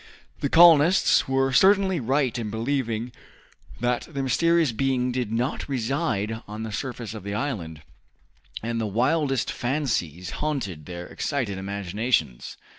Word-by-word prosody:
The 140 - -1
colonists 170 +1 +6
were 135 0 +1
certainly 190 +2 +4
right 135 +1 0
in 115 -3 -3
believing 115 0 -2 0.7
that 120 0 -1
the 140 -3 -3
mysterious 165 +3 +2
being 125 +1 0
did 125 -3 -2
not 120 +5 -2
reside 115 -4 -1
on 105 +2 -6
the 110 - -5
surface 120 0 -5
of 110 - -7
the 100 +1 -4
island, 90 - -4 0.8
and 115 0 -2
the 110 - -1
wildest 135 +5 +1
fancies 115 - -2
haunted 115 - -3
their 90 -1 -6
excited 120 -8 -3
imaginations. 100 - -2
120 Hz, 130 wpm, -25 LUFS, 105-140 Hz, 0.8 s, colonists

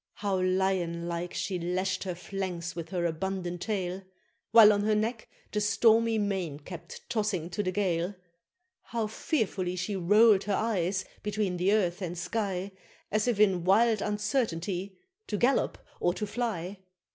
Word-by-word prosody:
How 200 -2 -1
lion 185 -2 0
like 175 +1 -3
she 185 -2 -2
lash'd 185 +3 -1
her 180 -2 -3
flanks 180 -2 -4
with 165 -2 -6
her 175 -1 -1
abundant 175 +1 -3
tail; 190 -3 -2 0.5
While 220 -2 +8
on 205 - +1
her 215 +1 +2
neck 220 +2 -2 0.2
the 210 - 0
stormy 225 +2 +4
mane 190 -8 -1
kept 165 +3 -10
tossing 200 -6 -1
to 205 - -1
the 185 -2 -1
gale! 180 -1 0 0.7
How 230 -2 -2
fearfully 210 - -1
she 195 +3 -2
roll'd 205 +2 +5
her 205 -1 +1
eyes 190 -4 0 0.2
between 210 -3 -1
the 180 +3 +2
earth 190 -3 +1
and 175 -1 -4
sky, 195 -1 -2 0.4
As 215 +2 +1
if 235 -4 +1
in 190 -5 +4
wild 215 +3 +4
uncertainty 200 -4 -1 0.3
to 210 - -2
gallop 250 +6 +2 0.2
or 175 +1 +1
to 210 - -2
fly! 205 -4 -3
195 Hz, 155 wpm, -29 LUFS, 180-210 Hz, 0.7 s, While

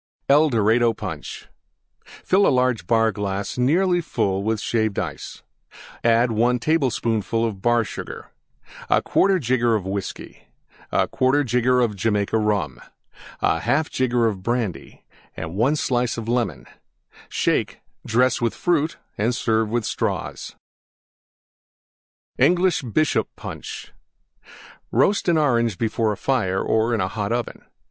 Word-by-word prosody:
EL 150 +3 +5
DORADO 115 0 +3
PUNCH - - -7 0.6
Fill 195 +2 +1
large 125 -7 +1
Bar 115 -1 +3
glass 100 0 -3
nearly 175 +7 +2
full 110 - -1
Shaved 110 -1 -1
Ice. - - -5 0.6
1 115 +1 +3
tablespoonful 115 -5 0
Bar 120 +4 +1
Sugar. - - -8 0.6
1/4 195 -1 +3
jigger 120 -4 +2
Whiskey. 95 0 -6 0.4
1/4 135 +2 +2
jigger 125 0 +2
Jamaica 105 +1 0
Rum. 100 - -1 0.6
1/2 140 - +1
jigger 120 -3 +1
Brandy. 105 0 -4 0.3
1 100 - 0
slice 125 -5 0
Lemon. 115 - -2 0.6
Shake; - - -1 0.2
dress 125 +3 +2
with 115 - 0
Fruit 165 -3 0 0.2
and 115 +4 +1
serve 110 -2 0
with 120 0 -1
Straws. - - -3 1.8
ENGLISH 175 +5 +3
BISHOP 135 +5 0
PUNCH - - -8 1.0
Roast 185 - +2
an 170 -2 +3
Orange 120 - +1
before 110 -1 0
a 105 - -4
fire 110 -8 0
or 110 +3 +1
in 105 - -1
a 95 - 0
hot 100 +2 -3
oven. 120 0 -3
115 Hz, 110 wpm, -22 LUFS, 105-130 Hz, 1.8 s, EL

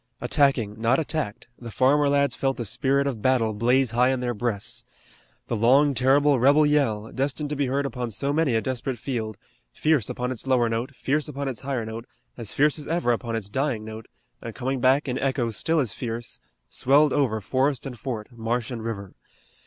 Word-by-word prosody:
Attacking, 115 -7 +1
not 115 +3 +3
attacked, 150 -8 -3
the 120 - -8
farmer 140 +5 +3
lads 140 0 +2
felt 135 -1 -1
the 120 - -3
spirit 140 +5 +1
of 130 -6 -3
battle 120 -3 +2
blaze 120 +3 +2
high 120 +2 +3
in 130 -1 0
their 125 -1 -1
breasts. 110 -2 -2 0.6
The - - -2
long, 135 +6 +4
terrible 135 +2 +3
rebel 145 +5 +5
yell, 115 -8 +1
destined 145 +2 -2
to - - -1
be 140 -1 0
heard 140 +2 0
upon 125 -2 -3
so 140 +6 -1
many 150 -6 +2
a 110 - +2
desperate 130 0 -3
field, 110 -4 -4 0.3
fierce 150 - +1
upon 125 +1 -3
its 130 +1 -5
lower 125 -3 +3
note, 115 +4 -3
fierce 145 +3 0
upon 140 -1 -4
its 130 -4 -4
higher 130 -4 -2
note, 115 +2 -7 0.3
as 115 -4 -5
fierce 150 +2 +2
as 150 - -8
ever 165 -6 +1
upon 115 0 -2
its 110 -3 -3
dying 120 0 -1
note, 110 0 -8 0.3
and 115 -1 -7
coming 130 +1 -2
back 135 +4 +3
in 125 0 -2
echoes 125 -4 0
still 165 +7 +1
as 125 -8 0
fierce, 120 -1 -5 0.3
swelled 145 +3 +3
over 125 -7 +1
forest 130 +7 0
and 125 -4 -7
fort, 110 -5 -4
marsh 115 +1 -2
and 115 -3 -5
river. 100 -4 -5
130 Hz, 200 wpm, -25 LUFS, 115-140 Hz, 0.6 s, rebel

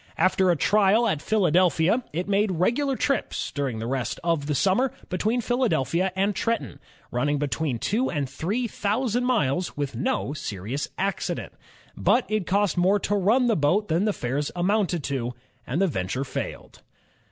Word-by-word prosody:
After 185 0 +3
a 175 - +4
trial 210 +6 +3
at 155 -9 0
Philadelphia, 185 +2 +2
it 175 +4 -3
made 200 0 +2
regular 250 - +1
trips, 275 +1 -1
during 135 -5 -2
the 110 - -4
rest 130 0 -2
of 165 -4 0
the 150 - 0
summer, 200 - +2 0.2
between 220 +6 0
Philadelphia 190 - +1
and 195 +1 +1
Trenton, 170 - -2 0.3
running 145 +4 0
between 145 -2 -1
two 225 - 0
and 145 -5 -2
three 195 - -2
thousand 230 +4 -1
miles 180 - 0
with 140 -4 -3
no 135 +3 -1
serious 115 +1 -4
accident. 195 0 -2 0.4
But 250 - +2
it 215 -4 -1
cost 200 -2 +1
more 190 +4 +3
to 205 - 0
run 215 +6 +3
the 230 -2 +3
boat 175 +8 +1
than 170 +6 +2
the 215 - +2
fares 140 -2 -2
amounted 180 -2 +1
to, 125 -3 -3 0.3
and 140 +7 -1
the 195 - +4
venture 125 - -2
failed. 135 - -6
185 Hz, 165 wpm, -25 LUFS, 145-215 Hz, 0.4 s, a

